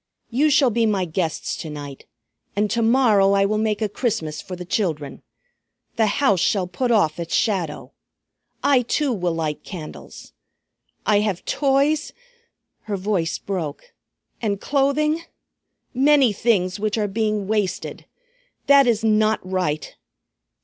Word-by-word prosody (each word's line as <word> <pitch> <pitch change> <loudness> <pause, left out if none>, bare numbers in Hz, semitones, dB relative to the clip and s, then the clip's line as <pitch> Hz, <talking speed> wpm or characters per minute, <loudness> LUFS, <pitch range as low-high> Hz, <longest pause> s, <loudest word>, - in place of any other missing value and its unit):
"You 285 +6 +3
shall 280 -4 +4
be 230 0 +2
my 195 -4 +1
guests 165 -1 -2
to 160 - -6
night. 145 -2 -8 0.5
And 205 +1 0
to 230 - +1
morrow 225 -5 +4
I 195 0 +3
will 215 +1 0
make 215 0 0
a - - +1
Christmas 205 - -2
for 185 - -7
the 180 0 -8
children. 165 -7 -2 0.7
The 220 -1 +2
house 205 -3 +2
shall 190 +2 +1
put 185 +8 -2
off 175 -9 +2
its 170 -1 -2
shadow. 185 -9 -1 0.7
I 275 -3 +4
too 265 +3 0
will 180 -5 -1
light 155 -2 -3
candles. 170 -6 -10 0.7
I 210 -1 +4
have 205 -4 -2
toys," 285 +2 +1 0.7
her 205 -2 -2
voice 185 -4 -1
broke, 180 - -5 0.5
"and 205 -4 -1
clothing; 295 +5 +1 0.7
many 270 -2 +4
things, 195 -3 +1
which 215 +1 -1
are 210 -1 0
being 210 -1 -1
wasted. 205 -4 -2 0.6
That 280 -2 +6
is 225 -2 +1
not 215 0 +3
right! 180 -6 -2
210 Hz, 140 wpm, -22 LUFS, 180-240 Hz, 0.7 s, That